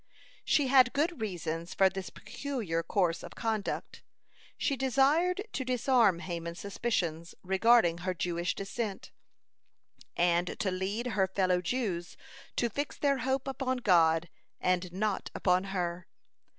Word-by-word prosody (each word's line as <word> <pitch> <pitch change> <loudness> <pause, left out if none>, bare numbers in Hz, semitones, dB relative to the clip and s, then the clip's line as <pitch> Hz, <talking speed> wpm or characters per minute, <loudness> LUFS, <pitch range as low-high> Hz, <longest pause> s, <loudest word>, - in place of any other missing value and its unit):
She 290 - +3
had 260 -2 +5
good 305 -1 0
reasons 170 -4 -4
for 195 - +5
this 190 0 -4
peculiar 230 - -4
course 170 0 0
of - - -10
conduct. 220 -3 -3 0.6
She 280 - 0
desired 280 +8 +2
to 265 - -2
disarm 245 -7 +3
Haman's 170 -2 -5
suspicions 175 -6 -2
regarding 190 -2 +4
her 185 +1 -2
Jewish 175 0 -1
descent, 200 +1 -4 1.1
and 175 0 +2
to 190 - 0
lead 195 +6 -2
her 205 -6 +1
fellow 185 -1 +1
Jews 180 -5 -2 0.4
to 240 - +1
fix 285 +6 -4
their 280 -2 +1
hope 265 +2 -1
upon 265 -1 -1
God 170 -6 +3 0.3
and 180 -1 0
not 200 +2 -2
upon 180 0 +2
her. 180 -2 -3
195 Hz, 130 wpm, -30 LUFS, 175-250 Hz, 1.1 s, had